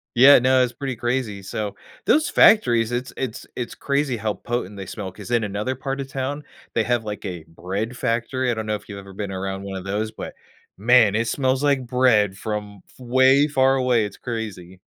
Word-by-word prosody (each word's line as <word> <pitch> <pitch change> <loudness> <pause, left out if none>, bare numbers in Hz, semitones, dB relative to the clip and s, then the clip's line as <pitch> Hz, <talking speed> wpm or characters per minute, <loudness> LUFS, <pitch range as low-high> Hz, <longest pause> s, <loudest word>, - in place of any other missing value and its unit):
Yeah, 135 +4 +8
no, 130 +1 +4
it's 125 -1 -2
pretty 135 -3 -4
crazy. 120 -4 -2
So, 100 +1 -4 0.3
those 315 +3 +3
factories, 120 - +5
is 120 - +1
it's 130 - -11
it's 125 -4 -4
it's 120 - -5
crazy 140 -3 -1
how 110 0 -1
potent 120 -4 -4
they 95 -2 -7
smell 100 -3 -6
‘cause 100 +3 -11
in 120 -2 +2
another 105 +5 -2
part 135 +1 -4
of 135 - -6
town, 140 +2 -3 0.3
they 115 - +2
have, 120 +1 0
like, 105 0 -6
a 90 -4 -5
bread 95 +8 -4
factory. 120 +3 -1
I - - +2
don't 110 0 -4
know 105 0 -1
if 105 - -10
you've 100 - -7
ever 100 0 -12
been 100 0 -5
around 95 +1 -4
one 100 -1 -5
of 95 - -7
those, 105 +2 -2
but, 110 - -7 0.4
man, 115 0 +5
it 115 +1 0
smells 130 +3 0
like 140 -3 +2
bread 115 -6 +3
from 105 -2 -5
f - - -23
way 130 +3 +4
far 135 -2 +3
away, 125 -4 +2
it's 100 -1 -8
crazy. 100 -7 -6
115 Hz, 215 wpm, -23 LUFS, 105-130 Hz, 0.4 s, Yeah